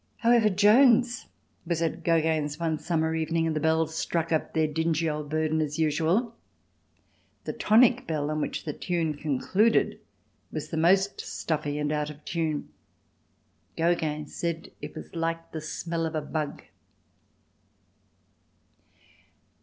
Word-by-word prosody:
However, 230 -2 +4
Jones 235 +5 +4 0.4
was 170 -1 -1
at 165 - -2
Gogin's 160 -2 +1
one 160 -2 -1
summer 160 -2 0
evening 165 +1 0
and 160 -1 -1
the - - +1
bells 160 +1 +1
struck 165 0 -1
up 160 - 0
their 160 -1 +3
dingy 160 +1 0
old 150 -1 -3
burden 155 0 0
as 150 -1 -2
usual. 165 +9 +1 1.1
The - - -4
tonic 245 +3 +4
bell 150 -2 -1
on 155 0 -1
which - - -3
the 150 - -3
tune 165 -2 -1
concluded 160 - +1 0.5
was - - -5
the - - -4
most 190 +5 +3
stuffy 150 -2 -3
and 150 0 -1
out 150 0 -1
of 150 0 -12
tune. 160 -3 -2 1.1
Gogin 160 -3 0
said 165 +1 -4
it - - -7
was - - -9
like 165 0 -2
the 160 - -5
smell 165 +2 -3
of 160 - -6
a 155 - 0
bug. 150 0 -4
160 Hz, 140 wpm, -27 LUFS, 155-170 Hz, 1.1 s, However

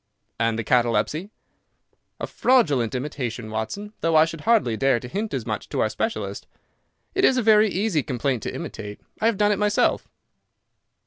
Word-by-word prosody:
"And 115 -1 +1
the 115 - -2
catalepsy?" 120 - +1 0.9
"A - - -2
fraudulent 145 - +2
imitation, 125 -4 -4
Watson, 155 - -4
though 165 -1 +1
I 155 0 +7
should 165 -1 -7
hardly 220 - +2
dare 135 0 +2
to 125 - -8
hint 205 - -3
as - - -3
much - - -4
to - - -3
our - - +2
specialist. - - -3 0.7
It 385 - 0
is 265 - +5
a 250 - +1
very 215 0 +5
easy 190 -4 0
complaint 130 -2 -2
to - - -4
imitate. 105 0 -7 0.2
I 220 - +2
have 230 -3 +1
done 210 0 +3
it 205 - 0
myself." 210 0 +1
150 Hz, 175 wpm, -24 LUFS, -, 0.9 s, I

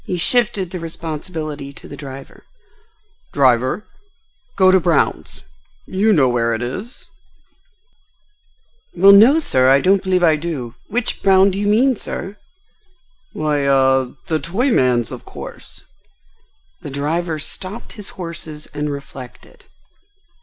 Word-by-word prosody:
He 180 - -3
shifted 200 -2 +3
the 180 - -5
responsibility 155 -3 -6
to - - -13
the 145 - -9
driver. 135 -1 -11 0.9
"Driver, 130 - +2 0.7
go 185 -1 +5
to 190 - +5
Brown's. 165 -3 -1 0.4
You 205 +4 +1
know 145 -10 +4
where 115 -2 0
it 110 - -4
is?" 195 - -6 1.9
"Well, 195 +3 +7
no, 225 +9 +7
sir, 130 - +2
I 135 +1 +6
don't 190 +4 +3
believe 185 -2 0
I 160 -2 +4
do. 145 -8 -5
Which 240 +2 -3
Brown 195 0 +5
do 190 - -4
you 205 - -1
mean, 245 +5 +3
sir?" 200 -1 -7 1.0
"Why—ah—the 140 0 0
toy 200 - -1
man's, 125 - +2
of - - -8
course." - - -11 1.0
The - - -7
driver 155 +4 -2
stopped 185 +8 -5
his 210 -4 -9
horses 165 -4 -7
and 150 0 -3
reflected. 140 -3 -10
160 Hz, 125 wpm, -19 LUFS, 140-195 Hz, 1.9 s, Well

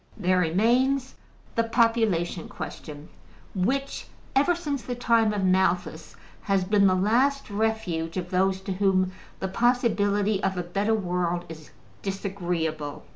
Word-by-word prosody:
There 185 -3 +2
remains 245 +10 +2 0.4
the 230 - +2
population 225 -8 +1
question, 150 0 -8 0.4
which, 265 +9 -1 0.3
ever 290 +6 +4
since 295 -6 -3
the 245 - -5
time 230 -2 +3
of 205 -2 -2
Malthus, 180 -3 0 0.3
has 195 -2 +1
been 200 +1 +4
the 185 - +3
last 245 +7 +1
refuge 200 -6 -1
of 180 0 -4
those 190 +1 +1
to 190 0 -3
whom 185 -1 +2 0.3
the 190 - -1
possibility 205 -3 +1
of 190 -2 -1
a 180 - -1
better 200 +6 0
world 175 -3 -1
is 155 -2 -10 0.3
disagreeable. 175 -6 -3
195 Hz, 130 wpm, -26 LUFS, 180-230 Hz, 0.4 s, ever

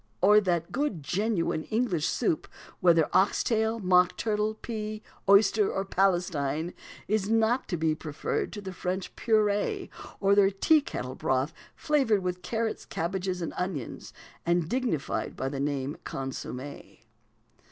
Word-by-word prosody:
or 210 +2 +6
that 175 -4 -1
good 240 - -1
genuine 180 -1 0
English 215 -8 0
soup, 160 - 0 0.3
whether 165 -3 +5
ox 190 +2 +3
tail, 220 0 +1
mock 180 -3 +3
turtle, 215 0 0
pea, 215 -1 -5 0.3
oyster, 200 +1 +5
or 195 - -2
Palestine, 175 -5 0 0.3
is 210 -1 0
not 225 +3 +2
to 175 - -2
be 160 -1 +1
preferred 155 -1 -3
to 205 - -6
the 190 -2 -6
French 185 +1 -4
purée, 210 -2 +1 0.3
or 195 0 +2
to - - +6
their 195 -1 +6
teakettle 195 - +1
broth 130 +2 0 0.2
flavoured 260 -10 +2
with 180 0 -2
carrots, 225 +1 -2
cabbages, 180 +1 -3
and 165 - -4
onions, 180 -9 -4 0.3
and 170 -1 +1
dignified 240 - -1
by 130 - -2
the 135 0 -4
name 140 0 -1
of 170 - -17
consommé? 135 0 -6
190 Hz, 140 wpm, -28 LUFS, 165-215 Hz, 0.3 s, or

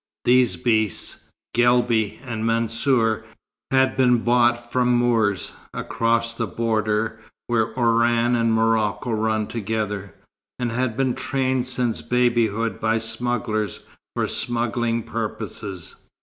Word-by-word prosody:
These 125 -1 +4
beasts, 110 -5 -1 0.3
Guelbi 120 -3 +2
and 115 -3 -4
Mansour, 115 0 +1 0.5
had 130 0 +3
been 125 -3 +3
bought 120 0 +2
from 125 -1 +2
Moors, 115 -5 +1 0.2
across 115 0 0
the 115 -1 -3
border 110 +1 -1 0.3
where 115 -2 +1
Oran 120 0 +3
and 115 -1 +2
Morocco 110 +1 +1
run 110 -1 0
together, 105 -2 -3 0.4
and 125 -2 -2
had 125 0 -1
been 130 -2 +1
trained 130 -2 -1
since 125 -8 -1
babyhood 115 +1 +1
by 110 +1 +1
smugglers 115 -1 -2 0.3
for - - 0
smuggling 120 -1 -1
purposes. 105 -5 -5
115 Hz, 110 wpm, -23 LUFS, 110-120 Hz, 0.5 s, These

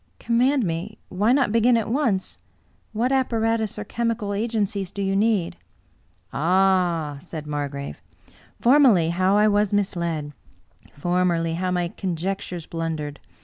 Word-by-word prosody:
" - - -42
Command 255 +3 +3
me. 175 +5 -4
Why 205 +5 +1
not 265 -4 +3
begin 230 +2 +4
at 225 - -1
once? 230 -6 -1 0.3
' - - -39
What 235 +4 0
appa 260 -3 +1
ratus 225 -2 0
or 210 - -4
chemical 230 -1 -2
agencies 205 -3 -1
do 200 - -9
you 195 0 0
need? 205 -4 +1 0.2
" - - -38
" - - -36
Ah! 175 -2 +2
" - - -12
said 155 +1 -8
Margrave. 145 -1 -5 0.3
" - - -29
Formerly, 240 - +5
how 185 +3 +2
I 210 +1 +5
was 205 -1 +2
misled 170 -7 -1 0.5
t - - -22
Formerly, 175 +1 0
how 180 +2 -1
my 175 -1 0
conjectures 180 -1 -4
blundered 160 -3 -4
195 Hz, 160 wpm, -23 LUFS, 170-225 Hz, 0.5 s, Formerly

